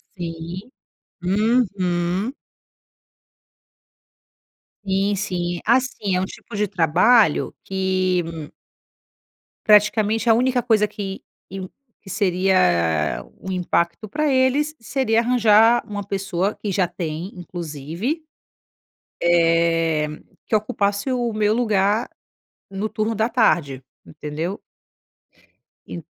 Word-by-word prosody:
Sim, 170 +4 -6 0.5
uhum. 195 0 0 2.5
Sim, 195 +1 +1
sim, 175 -3 -2
assim 235 -5 +1
é 180 - +1
um - - 0
tipo 205 - -11
de 210 +1 +1
trabalho 185 +3 +3
que 185 -1 0 1.4
Praticamente, 215 +1 +4
a - - +7
única 250 +2 +2
coisa 215 -3 +3
que 200 -2 -6 0.3
in 190 -1 -6 0.3
que 190 - -13
seria 170 - +1 0.2
um 190 - -5
impacto 180 +2 -1
para 300 +6 0
eles, 265 +4 +2
seria 230 -1 0
arranjar 230 -1 +4
uma 205 -2 -5
pessoa 195 -1 -2
que 205 - -4
já 185 -1 +1
tem, 170 0 -5
inclusive, 175 - -5 1.0
eh, 165 -2 +2 0.4
que 215 - +1
ocupasse 205 +3 -1
o 240 -2 -1
meu 215 0 +1
lugar 215 -1 +1 0.6
no 195 +2 -3
turno 220 +1 -2
da 220 +2 +1
tarde. 145 - +1 0.2
Entendeu? 155 +5 -5 1.3
Eu 170 - -7
195 Hz, 100 wpm, -22 LUFS, 175-220 Hz, 2.5 s, a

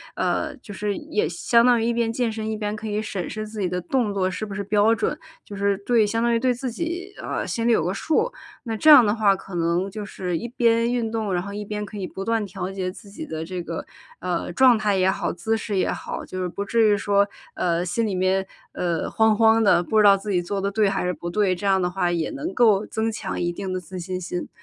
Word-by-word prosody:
呃， - - -1
就 205 - -11
是 205 +1 -2
也 320 +9 -1
相 235 -1 +3
当 245 -1 +5
于 - - 0
一 235 - +1
边 230 -1 0
健 240 0 0
身， 220 0 -4
一 215 - -3
边 210 0 -3
可 215 +1 -6
以 210 0 -1
审 195 -5 -4
视 215 0 -5
自 215 -1 -6
己 185 - 0
的 180 0 -2
动 210 +4 0
作 190 -2 +1
是 200 +3 -4
不 205 - -7
是 200 - -3
标 210 +2 +3
准， 230 +7 -1 0.3
就 205 - -9
是 200 0 +1
对， 235 -3 +4
相 225 +2 -1
当 235 0 +2
于 - - +4
对 250 +2 +2
自 250 +2 -4
己， 345 - -4
呃， - - -3
心 230 - -2
里 - - +5
有 190 -8 +3
个 180 - 0
数， 440 - 0 0.3
那 225 -3 -3
这 305 +8 +3
样 275 -6 +10
的 205 +1 +1
话 210 -3 +4
可 195 -1 -8
能 170 +3 0
就 210 +2 -6
是， 180 -3 -3
一 235 +7 -5
边 230 -1 +2
运 240 -2 0
动， 220 -3 -2
然 175 - +1
后 200 +2 -7
一 210 +1 -4
边 210 0 -4
可 210 - -9
以 195 - -3
不 190 +1 -6
断 225 -2 0
调 185 -1 -5
节 190 -1 -3
自 200 +2 -14
己 265 +11 -7
的 160 - -5
这 180 +1 -5
个， 165 -1 -5 0.3
呃， 175 -1 -2
状 250 +5 +5
态 210 -2 +1
也 185 0 +3
好、 190 - -1
姿 220 +6 -1
势 215 -2 -3
也 185 - +1
好， - - -5
就 185 - -5
是 180 - -1
不 200 +3 -4
至 230 +2 +3
于 205 - +3
说， 200 0 +2 0.3
呃， 170 0 0
心 225 +6 0
里 210 - -2
面， 185 +1 +1 0.3
呃， 170 -2 -1
慌 220 0 +3
慌 225 0 +5
的， 195 -4 +5
不 215 +5 -1
知 215 - +6
道 200 -1 +7
自 200 +2 -7
己 180 - +2
做 195 +3 -3
得 200 +1 0
对 205 0 +2
还 195 -1 -1
是 180 - 0
不 170 +2 -6
对， 195 0 +1
这 180 - -7
样 195 -1 +4
的 180 - +1
话 180 -1 0
也 170 -2 -1
能 305 +6 -4
够 215 -4 +4
增 220 +1 -2
强 210 -3 -4
一 175 - 0
定 190 +2 -5
的 185 - -2
自 180 +1 -8
信 185 +1 -4
心。 180 0 -4
205 Hz, 290 characters per minute, -23 LUFS, 185-225 Hz, 0.3 s, 样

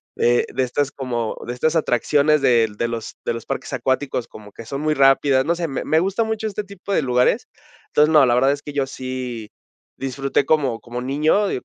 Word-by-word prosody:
de 120 0 +2
de 130 - +1
estas 140 +3 -1
como 120 -4 -3
de 120 - -3
estas 160 +6 +1
atracciones 145 +2 +2
del 115 -4 +3
de 115 +3 -1
los 115 -1 -5
de - - -1
los 115 - -7
parques - - -4
acuáticos, 130 -2 -1
como 105 -2 -13
que 115 - -11
son 140 +5 -5
muy 155 0 +1
rápidas. 135 -1 +4
No 170 +1 +1
sé, 170 -3 -3
me 135 - -4
me 160 +2 +3
gusta 195 +5 0
mucho 220 0 -2
este 210 0 -4
tipo 200 0 -9
de - - +3
lugares. 125 - +1 0.4
Entonces, 150 +1 +4
no, 150 -3 +6
la 120 -1 +3
verdad 135 +2 +4
es 145 0 -3
que 145 - -8
yo 140 -2 0
sí 130 -4 -6 0.5
disfruté 135 +1 -1
como 135 -7 +1
como 120 +1 -6
niño, 155 +10 +1
y, - - -2
135 Hz, 215 wpm, -21 LUFS, 125-155 Hz, 0.5 s, no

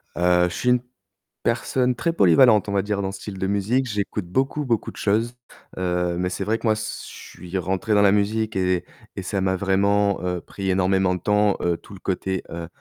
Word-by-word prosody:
Heu, 90 0 +3
je - - -7
suis 125 -1 +2 0.6
personne 125 -1 +1
très 170 +7 0
polyvalente 105 - +5
on 100 - -3
va 100 - +2
dire 100 0 -2
dans 95 -1 -2
ce 95 -1 -9
style 100 -3 -7
de 95 - -1
musique. 105 +7 +1
J'écoute 105 -2 -3
beaucoup, 135 +9 -1
beaucoup 115 -4 -1
de - - -16
choses, 115 +4 0 0.4
heu, 90 -1 -1
mais 90 +1 0
c'est 90 +2 -3
vrai 110 +3 0
que - - -2
moi, 110 - +5
s 110 0 -5
je - - -12
suis 90 +2 -5
rentré 95 +4 -1
dans 105 - +5
la 100 -1 +5
musique 105 +2 0
et 90 -2 +1 0.3
et - - -4
ça 100 - -2
m'a 95 0 +1
vraiment, 100 +1 +2
heu, 90 -1 -2
pris 95 +2 -5
énormément 95 0 +2
de 90 - -7
temps, 105 0 +2
heu, 85 -1 +1
tout - - -15
le 95 - -10
côté, 95 -1 -2
heu 85 0 -6
100 Hz, 220 wpm, -23 LUFS, 90-105 Hz, 0.6 s, polyvalente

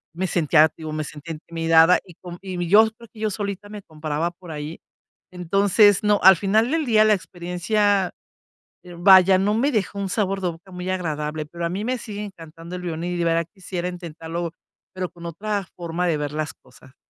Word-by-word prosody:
me 185 +2 -1
sentía, 160 -2 +4
digo, 155 -1 -6
me 155 0 -2
sentía 150 +3 -8
intimidada 165 +2 +3
y 175 -3 -15
con 175 0 -10
y 180 -2 -4
yo 220 +3 +7
creo 235 - -14
que 220 - -14
yo 215 - +1
solita 200 0 -5
me 210 -1 -9
comparaba 155 +1 -3
por 175 0 -15
ahí. 150 +1 -6 0.5
Entonces 195 +3 +3
no, 210 -1 +3
al 190 -1 +9
final 215 +7 +2
del 320 -1 0
día 215 -3 +4
la 215 - +5
experiencia, 185 +2 0 0.9
vaya, 190 0 +7
no 200 +2 +1
me 270 +6 +2
dejó 205 -4 -1
un 195 -1 -2
sabor 195 -1 -1
de 180 - 0
boca 170 +3 -11
muy 180 0 -5
agradable, 155 -4 -3
pero 170 +2 -5
a - - -1
mí 190 +4 -3
me 255 +1 -1
sigue 210 -3 -6
encantando 165 -2 -10
el 180 - -7
violín 170 +1 -3
y - - -3
de 170 - 0
verdad 165 0 +1
quisiera 180 -3 -5
intentarlo, 170 -1 -6 0.4
pero 185 -1 -4
con 170 0 -13
otra 200 +3 -3
forma 175 +1 -2
de 165 -3 +1
ver 145 -1 -3
las 155 0 -3
cosas. 130 +1 -20
180 Hz, 200 wpm, -23 LUFS, 165-200 Hz, 0.9 s, al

